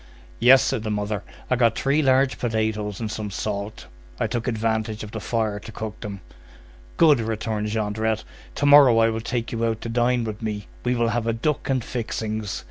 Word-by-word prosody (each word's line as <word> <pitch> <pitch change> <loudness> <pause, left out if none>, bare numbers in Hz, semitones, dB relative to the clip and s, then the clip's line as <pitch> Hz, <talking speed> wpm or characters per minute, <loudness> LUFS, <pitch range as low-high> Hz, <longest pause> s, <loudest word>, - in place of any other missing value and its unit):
"Yes," 130 +3 +7
said 135 -5 -1
the 110 - -4
mother. 105 -1 -2 0.3
"I - - +5
got 115 -2 +2
three 140 +3 +2
large 135 -1 +3
potatoes 110 -3 -1
and 110 -2 -3
some 105 -1 -4
salt. 100 +1 -4 0.3
I - - +1
took 120 0 -3
advantage 110 -1 -1
of 105 - -8
the 110 - -5
fire 110 0 -1
to 110 - -10
cook 110 -1 -6
them." 100 -3 -7 0.8
"Good," 150 -5 +6
returned 110 -1 -2
Jondrette. 110 0 -1 0.3
"To 145 - -1
morrow 145 -5 +8
I 115 0 +4
will 110 0 -3
take 120 0 -3
you 115 0 -2
out 115 -1 0
to 115 - -5
dine 120 +1 +1
with 110 -1 -5
me. 105 -2 -3 0.2
We 125 0 +1
will 120 -1 +1
have 115 -1 -1
a 115 - +2
duck 140 +7 -1
and 130 -3 +1
fixings. 110 -4 -3
110 Hz, 200 wpm, -24 LUFS, 110-120 Hz, 0.8 s, morrow